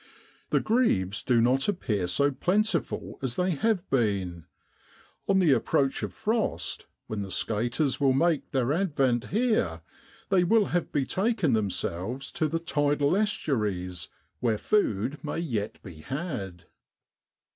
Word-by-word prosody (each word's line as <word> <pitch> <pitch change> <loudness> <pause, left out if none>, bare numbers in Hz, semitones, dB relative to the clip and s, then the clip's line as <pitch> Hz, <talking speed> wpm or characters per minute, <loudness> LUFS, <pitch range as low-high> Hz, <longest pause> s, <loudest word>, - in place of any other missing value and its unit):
The - - +3
grebes 105 - +1
do 125 -2 +2
not 130 +3 +2
appear 110 - -1
so 140 +11 +2
plentiful 180 +5 -1
as 130 -3 -2
they 185 +1 +1
have 190 +3 0
been: 100 - 0 0.8
on 195 - +3
the 180 -6 +4
approach 135 +1 +2
of - - -3
frost, 220 +1 -2 0.2
when 110 -2 -4
the 100 - -5
skaters 120 - 0
will 140 -2 +4
make 160 +3 +1
their 130 0 +1
advent 135 -9 +1
here, 210 - 0 0.5
they 185 -3 +4
will 215 +4 +4
have 175 -2 0
betaken 185 - +1
themselves 110 +4 -2
to 155 - 0
the 165 +2 -1
tidal 145 -1 +1
estuaries, 105 - -1 0.3
where 115 -3 +1
food 135 - 0
may 150 - -3
yet 115 -10 -3
be 90 -5 -10
had. 130 - -5
135 Hz, 135 wpm, -27 LUFS, 105-175 Hz, 0.8 s, the